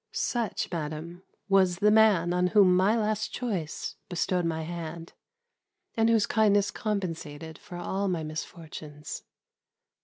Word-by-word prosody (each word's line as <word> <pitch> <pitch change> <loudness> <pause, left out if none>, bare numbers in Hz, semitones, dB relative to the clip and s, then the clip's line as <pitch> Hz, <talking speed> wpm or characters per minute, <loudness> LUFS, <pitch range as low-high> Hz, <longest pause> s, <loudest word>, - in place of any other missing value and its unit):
Such, 235 -8 -1
madam, 165 +1 -5 0.3
was 190 -3 +4
the 210 +3 +3
man 205 -6 +5
on 180 0 +2
whom 185 -2 +5
my 195 +5 +3
last 215 -1 -1
choice 195 -11 -3
bestowed 180 0 0
my 160 -1 -1
hand, 165 0 -6 0.8
and 225 0 +3
whose 225 -2 +4
kindness 205 -2 +3
compensated 165 -7 -4
for 185 -4 -9
all 190 +3 -2
my 175 -4 -1
misfortunes. 155 -1 -7
180 Hz, 125 wpm, -28 LUFS, 165-210 Hz, 0.8 s, man